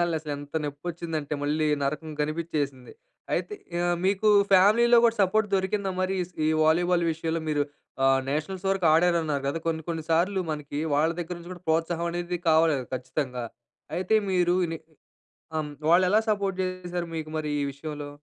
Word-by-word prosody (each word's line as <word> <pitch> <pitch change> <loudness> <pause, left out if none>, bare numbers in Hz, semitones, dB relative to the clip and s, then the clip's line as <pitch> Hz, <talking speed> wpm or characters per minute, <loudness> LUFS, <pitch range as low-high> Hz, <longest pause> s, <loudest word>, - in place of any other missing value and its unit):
తగిలింగాల్నే 170 -1 +1
అసలెంత 145 0 -5
నొప్పి 145 0 -5
వచ్చిందంటే 160 -3 -3
మళ్ళీ 155 +2 +1 0.2
నరకం 150 +3 -2
కనిపిచ్చేసింది. 150 -4 -2 0.4
అయితే 420 - -2 0.3
ఆహ్, 175 0 +1
మీకు 200 +2 +2 0.2
ఫ్యామిలీలో 230 +6 +6
గూడా 230 -1 +4
సపోర్ట్ 205 +3 +2
దొరికిందా 195 +1 0
మరి 185 +1 0
ఈస్ 180 +1 -9 0.3
వాలీబాల్ 175 +2 +3
విషయంలో? 165 +1 -2
మీరు 145 -1 +1 0.4
ఆహ్, 135 0 +4
నేషనల్స్ 180 +6 -3
వరకు 195 -3 +1
ఆడారన్నారు 160 -4 +2
కదా! 165 +4 -2
కొన్ని 160 -1 -1
కొన్ని 165 -2 -3
సార్లు 185 +4 +2
మనకి 150 -1 -4
వాళ్ళ 155 +3 +3
దగ్గర 175 +1 -5
నుంచి 170 +1 -11
కూడా 180 0 -11
ప్రోత్సాహం 165 +1 +1
అనేది 175 +1 -3
కావాలి 160 0 +5
గదా! 130 - -5
ఖచ్చితంగా. 125 -1 -3 0.5
అయితే 185 +4 +1 0.2
మీరు 180 -1 +3 0.2
ని 165 - -3 0.8
అమ్ 150 -1 -3 0.2
వాళ్ళు 180 +2 +6
ఎలా 210 +4 +4
సపోర్ట్ 200 -2 -1
జేశారు 180 -1 -3
మీకు 155 -1 -5
మరి 150 -1 -2
ఈ - - 0
విషయంలో? 145 +1 -6
165 Hz, 160 wpm, -26 LUFS, 150-185 Hz, 0.8 s, ఫ్యామిలీలో